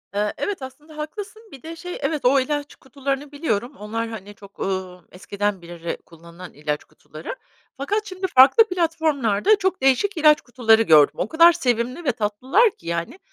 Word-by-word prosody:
Eee, 210 0 0
evet, 405 -8 -3
aslında 295 +4 -11
haklısın, 410 +8 -7
bir 270 - -13
de 330 +1 -7
şey, 360 +1 -7
evet, 305 -5 -2
o 270 +2 +5
ilaç 290 +2 -3
kutularını 275 +1 -5
biliyorum. 275 -3 -2
Onlar 225 +2 -4
hani, 205 -2 -9
çok, 200 0 -17
ııı, 185 -2 -4
eskiden 200 +1 -3
beri 170 0 -6
kullanılan 170 +2 -13
ilaç 150 0 -4
kutuları - - -10 0.4
fakat 415 +10 -2
şimdi 375 -1 -4
farklı 265 - +7
platformlarda 320 - +1
çok 380 -5 -1
değişik 295 +9 +2
ilaç 305 -1 +5
kutuları 225 -3 +3
gördüm. 155 -7 +5
O 190 - -1
kadar 335 +4 +6
sevimli 250 0 -1
ve 255 - +3
tatlılar 250 - +1
ki 170 - -17
yani, 170 - -4
260 Hz, 165 wpm, -22 LUFS, 205-320 Hz, 0.4 s, farklı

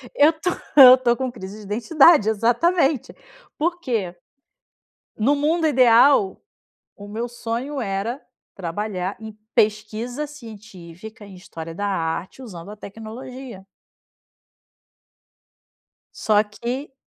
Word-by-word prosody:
Eu 300 +3 +5
tô, 320 +3 -3 0.3
eu 255 -2 +10
tô 240 -2 +1
com 260 -1 -3
crise 200 -3 -9
de - - -12
identidade, 245 - +4
exatamente. 265 - +1 0.4
Por 345 +3 -1
quê? 220 - -3 1.0
No 260 +7 +2
mundo 315 +3 +1
ideal, 250 -5 +4 0.6
o 205 0 -11
meu 230 +4 -4
sonho 240 +4 -5
era 215 +4 -3 0.3
trabalhar 190 +1 -4
em 220 -1 -10 0.2
pesquisa 220 +6 -1
científica, 220 - -12
em 200 -2 -13
história 165 -2 -9
da 205 +3 -3
arte, 180 +4 -3
usando 185 -6 -10
a 210 - -9
tecnologia. 225 +1 -10 2.5
Só 210 -1 +2
que 245 +7 -6
225 Hz, 110 wpm, -22 LUFS, 205-265 Hz, 2.5 s, eu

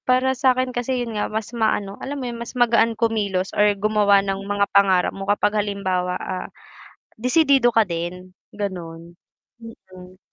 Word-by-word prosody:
Para 255 +1 +3
sa'kin 255 -1 +1
kasi 245 +1 -2
yun 230 - -7
nga 210 - -2
mas 220 +2 -4
maano, 215 -4 0
alam 285 +2 -5
mo 265 - -5
yun 235 -1 -6
mas 235 +2 -8
magaan 230 -2 +3
kumilos 205 -5 -1
or 205 -1 +3
gumawa 205 -1 +3
ng 195 0 -2
mga 205 0 +1
pangarap 190 -2 +3
mo 195 +1 -7
kapag 205 +1 +2
halimbawa, 185 -3 -2
ah, 185 -1 -5 0.7
disidido 260 -1 +3
ka 225 - +5
din 180 0 -5 0.2
ganun, 170 -4 -7 0.4
mm. 185 -5 -14
205 Hz, 155 wpm, -22 LUFS, 190-235 Hz, 0.7 s, ka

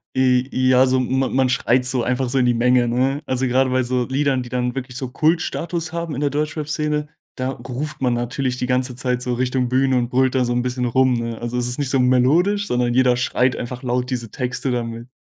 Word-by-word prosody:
J 130 0 +2
ja, 130 0 +4
so 130 0 +2
ma 130 +1 0
man 130 0 +2
schreit 125 0 +1
so 125 -1 0
einfach 125 +2 0
so 130 +3 -1
in 125 - +3
die 120 - +3
Menge, 125 +1 +3
ne? 130 +4 0
Also, 130 -1 -1
grade 130 +1 +2
bei 130 0 +1
so 125 0 -1
Liedern, 135 -1 0
die 120 - -10
dann 125 0 -2
wirklich 125 -2 -5
so 130 - -3
Kultstatus 165 +3 -1
haben 170 -2 -3
in - - -4
der 145 - +1
Deutschrapszene, 150 0 -2 0.3
da 130 +1 -2
ruft 135 +5 -6
man 125 -2 +2
natürlich 125 +2 -2
die 125 - -2
ganze 125 0 -1
Zeit 125 -1 -1
so 125 0 -2
Richtung 125 0 0
Bühne 130 +1 +2
und 120 -1 0
brüllt 130 +1 +2
da 130 - +3
so 120 - -1
'n 120 0 0
bisschen 125 0 -2
rum, 130 +2 +3
ne? 115 -1 -3
Also, 120 +1 -4
es 125 0 -1
ist 125 - -4
nicht 140 -3 -1
so 135 - +2
melodisch, 160 +12 +3
sondern 120 0 0
jeder 125 0 +4
schreit 125 0 +1
einfach 125 +2 -6
laut 125 0 -1
diese 120 -3 -3
Texte 130 +1 -3
da 120 -1 0
mit. 115 +1 -7
125 Hz, 235 wpm, -21 LUFS, 125-135 Hz, 0.3 s, ja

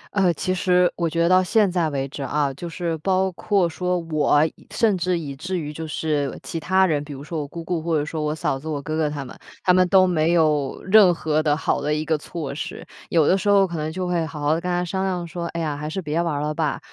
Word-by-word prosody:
呃， 190 -3 +4
其 185 +3 -1
实 180 -1 +3
我 170 -1 -1
觉 170 +1 0
得 - - +3
到 185 0 +5
现 210 0 +3
在 175 -3 +1
为 135 -2 -2
止 140 +1 -8
啊， 140 0 0
就 170 +6 -7
是 170 0 -3
包 190 +3 +1
括 190 0 +1
说 180 +2 -1
我， 155 -3 +2 0.3
甚 220 -4 +2
至 180 0 0
以 145 -4 -5
至 180 +7 -4
于 150 -3 -5
就 160 +1 -6
是 150 -2 -2
其 165 - -4
他 190 +4 +3
人， 150 -5 0
比 145 0 -8
如 135 0 -8
说 160 +1 -4
我 145 - -5
姑 170 +3 -8
姑 170 0 -2
或 165 -1 0
者 145 - -1
说 155 0 -4
我 150 0 -1
嫂 135 -3 -1
子， 155 - -10
我 150 -2 -2
哥 155 +2 -4
哥 155 -1 +1
他 145 -2 -5
们。 - - -10 0.3
他 180 - +4
们 185 0 +4
都 190 -1 +6
没 170 -2 +2
有 150 -5 +1
任 195 -1 +7
何 155 -1 0
的 150 -2 +2
好 - - 0
的 150 +1 0
一 155 +1 -2
个 160 0 +1
措 150 -2 -6
施。 145 - -6 0.2
有 160 -3 +3
的 - - +5
时 205 - -1
候 200 -1 +5
可 175 -2 -6
能 155 0 -3
就 180 +2 -3
会 175 -2 0
好 160 -1 -8
好 145 +1 +2
的 165 - -1
跟 180 - -3
他 175 0 0
商 190 +2 -2
量 180 -2 -2
说， 170 +1 -5
哎 170 - -5
呀， 155 -3 -2
还 150 +1 -5
是 190 - -3
别 155 0 -1
玩 165 -4 -1
了 150 0 -1
吧。 150 -2 -1
165 Hz, 295 characters per minute, -23 LUFS, 150-180 Hz, 0.3 s, 任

